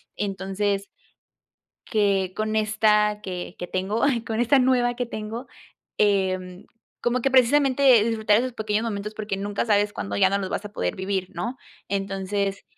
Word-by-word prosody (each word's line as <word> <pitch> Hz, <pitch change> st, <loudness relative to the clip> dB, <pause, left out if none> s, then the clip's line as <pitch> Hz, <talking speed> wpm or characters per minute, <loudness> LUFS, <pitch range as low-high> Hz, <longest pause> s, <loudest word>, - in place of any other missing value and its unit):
entonces 195 Hz, 0 st, -2 dB, 1.0 s
que 200 Hz, -4 st, +1 dB
con 215 Hz, 0 st, -1 dB
esta 210 Hz, 0 st, +2 dB
que 180 Hz, -3 st, -6 dB
que 180 Hz, -, -5 dB
tengo, 190 Hz, +5 st, -2 dB, 0.2 s
con 225 Hz, +1 st, -1 dB
esta 265 Hz, +4 st, +4 dB
nueva 250 Hz, -1 st, +3 dB
que 245 Hz, +1 st, -2 dB
tengo, 225 Hz, +3 st, -6 dB, 0.5 s
em, 185 Hz, -2 st, 0 dB, 0.3 s
como 245 Hz, +1 st, 0 dB
que 270 Hz, -, +1 dB
precisamente 265 Hz, 0 st, +5 dB
el 215 Hz, -, +1 dB
disfrutar 220 Hz, -2 st, +2 dB
de 235 Hz, -, +2 dB
esos 255 Hz, -2 st, -5 dB
pequeños 215 Hz, +1 st, -1 dB
momentos 210 Hz, -1 st, -4 dB
porque 210 Hz, -2 st, -3 dB
nunca 205 Hz, +3 st, -2 dB
sabes 205 Hz, -1 st, +2 dB
cuándo 100 Hz, +1 st, -4 dB
ya 145 Hz, -, +4 dB
no 200 Hz, -, +1 dB
los 190 Hz, -2 st, -3 dB
vas -, -, -3 dB
a 205 Hz, -, -8 dB
poder -, -, -2 dB
vivir, 190 Hz, -1 st, -2 dB
¿no?, 245 Hz, +3 st, -4 dB, 0.3 s
entonces, 195 Hz, 0 st, -2 dB
210 Hz, 165 wpm, -24 LUFS, 195-230 Hz, 1.0 s, precisamente